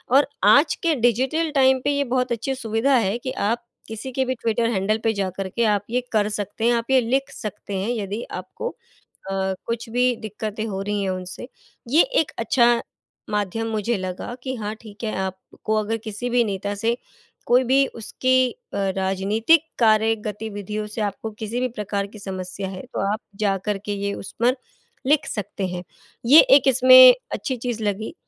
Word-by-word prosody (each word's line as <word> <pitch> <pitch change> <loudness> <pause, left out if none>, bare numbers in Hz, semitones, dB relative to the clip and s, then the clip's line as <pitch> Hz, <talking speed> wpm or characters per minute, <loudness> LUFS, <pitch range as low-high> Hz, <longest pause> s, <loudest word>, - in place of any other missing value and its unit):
और 280 - +5 0.2
आज 290 +3 +5
के 330 -2 +3
डिजिटल 260 +7 +1
टाइम 265 -1 +5
पे 285 - +2
ये 285 - +2
बहुत 250 -1 -1
अच्छी 235 +3 -2
सुविधा 230 +3 +1
है 220 -3 +1
कि 255 +2 -5
आप 235 -1 -1 0.2
किसी 225 +4 -6
के 265 +1 0
भी 260 - -1
ट्विटर 230 0 0
हैंडल 210 0 +1
पे 225 - +2
जाकर 195 -1 -3
के 235 +5 -1
आप 205 -2 +2
ये 250 +2 0
कर 210 -2 +2
सकते 210 +1 -3
हैं 240 - +4
आप 235 +2 -1
ये 265 - +6
लिख 265 +4 0
सकते 205 -2 -6
हैं 195 +4 -2
यदि 215 -1 -3
आपको 185 - -5
अ, - - -12 0.9
कुछ 230 0 -3
भी 250 +1 +2
दिक्कतें 215 0 -5
हो 195 -3 -4
रही 205 0 -2
हैं 195 - -1
उनसे। 185 +6 -6 0.4
ये 300 +7 +6 0.2
एक 320 - -2
अच्छा 235 +1 +3 0.5
माध्यम 210 +2 -1
मुझे 220 +2 0
लगा 185 +5 -5
कि 260 0 -3
हाँ 215 -1 -4
ठीक 215 +1 -10
है, 215 - -2
आपको 190 +3 -4
अगर 215 +1 -1
किसी 220 +3 -4
भी 245 0 +3
नेता 200 -1 -3
से 225 +4 0 0.5
कोई 250 +2 +4
भी 270 +2 +4
उसकी 255 +2 0
अ, - - -12 0.2
राजनीतिक 200 - +2
कार्य 220 -1 +4
गतिविधियों 210 0 -4
से 215 +2 -6
आपको 210 +2 -3
किसी 220 +3 -4
भी 255 - 0
प्रकार 205 -3 -3
की 215 +2 -13
समस्या 190 0 -5
है 185 -1 -7
तो - - -1
आप 215 - -3 0.2
जाकर 195 +1 0
के 205 - -3
ये 200 0 -1
उस - - -8
पर 245 +2 +3 0.5
लिख 295 +2 +3
सकते 200 -2 -4
हैं। 180 0 -5 0.4
ये 290 +6 +10
एक 275 0 +5
इसमें 255 0 +9 0.2
अच्छी 265 -4 -2
चीज़ 235 -2 -4
लगी। 210 +7 -2
225 Hz, 185 wpm, -23 LUFS, 205-250 Hz, 0.9 s, ये